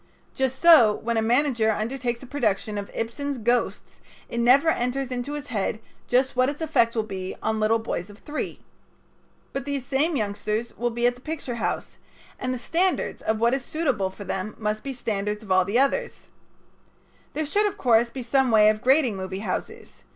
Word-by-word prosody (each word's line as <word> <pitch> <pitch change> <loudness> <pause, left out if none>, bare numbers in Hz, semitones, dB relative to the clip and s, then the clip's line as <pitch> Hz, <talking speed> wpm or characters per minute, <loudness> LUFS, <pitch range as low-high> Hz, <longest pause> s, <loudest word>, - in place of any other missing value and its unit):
Just 265 0 -1
so 290 -12 +7
when 235 +1 -2
a 225 - +2
manager 235 -1 +2
undertakes 240 +3 -2
a - - -8
production 215 -6 -1
of 200 - -7
Ibsen's 275 +5 -3
"Ghosts" 240 +1 -1 0.3
it 235 - -3
never 260 +7 +5
enters 255 -1 -1
into 250 +3 -3
his 295 -1 -6
head 210 -3 -1 0.3
just 255 +2 +2
what 255 +1 +3
its 290 - -6
effect 235 -8 +2
will 220 - +1
be 190 -3 -5
on 220 0 0
little 215 +1 +3
boys 220 -4 -4
of 205 - -13
three. 295 +6 -5 0.9
But 275 -1 -3
these 280 -3 -3
same 285 +5 +1
youngsters 215 0 -2
will 240 +1 -1
be 235 +1 -1
at 245 - +4
the 245 - -17
picture 305 -4 -4
house, - - -3 0.4
and 255 - -2
the 255 - -2
standards 345 +10 0
of 220 - 0
what 235 +2 +3
is 270 -1 -1
suitable 265 - -1
for 195 +2 -10
them 195 +2 -4
must 215 0 -2
be 275 - -4
standards 210 -4 -3
of 195 - -8
all 185 -1 +4
the 200 +5 0
others. 280 - 0 1.0
There 310 +1 -1
should, 415 +8 +2
of 410 0 -5
course, 235 - +3
be 255 +1 -6
some 265 +2 +2
way 215 -2 +6
of 215 0 -5
grading 260 -3 +3
movie 190 0 -5
houses. - - -5
240 Hz, 195 wpm, -25 LUFS, 215-275 Hz, 1.0 s, so